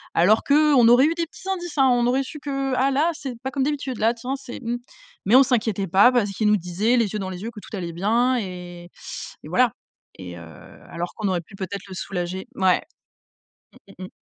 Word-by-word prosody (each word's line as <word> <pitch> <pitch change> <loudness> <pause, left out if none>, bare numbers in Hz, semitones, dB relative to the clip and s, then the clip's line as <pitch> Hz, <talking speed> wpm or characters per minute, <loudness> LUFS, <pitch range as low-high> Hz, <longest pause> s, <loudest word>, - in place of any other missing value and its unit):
Alors 200 +6 +4
qu'on 285 -4 +5
aurait 245 +4 +6
eu 325 - +2
des 335 -1 -1
petits 385 - -14
indices, 350 -5 -4
hein. 270 -1 +5
On 240 0 +2
aurait 265 +2 +2
su 300 +3 -9
que: 275 -2 -2
«Ah 270 +2 +2
là, 310 +6 +2
c'est 275 -4 -6
pas 265 - -3
comme 275 -2 -1
d'habitude 275 -4 -2
là, 220 - +2
là 235 - +3
tiens 250 +4 -4
c'est 260 -2 -9
mmh». 240 +1 -2 0.5
Mais 220 +6 +4
on 270 - +9
s'inquiétait 220 -6 0
pas 200 +8 +6
parce 210 -5 +1
qu'il 210 +2 -1
nous 210 0 +4
disait 190 +7 0
les 225 -5 +1
yeux 210 - -2
dans 190 -1 -4
les 185 +2 -7
yeux 230 - -4
que 215 - -10
tout - - -9
allait 170 -2 -5
bien 235 +8 +2
et 180 -3 -7 0.6
et - - -10
voilà - - +3 0.5
et 90 -2 -8
heu, - - -10 0.5
alors 170 +1 -5
qu'on 215 -2 -2
aurait 180 -2 0
pu 195 - -16
peut-être 195 0 -5
le - - -8
soulager. 185 0 -4
Mouais. 190 -1 +3 1.2
Mmh, - - -6
mmh - - -5
mh. - - -11
230 Hz, 235 wpm, -23 LUFS, 190-265 Hz, 1.2 s, on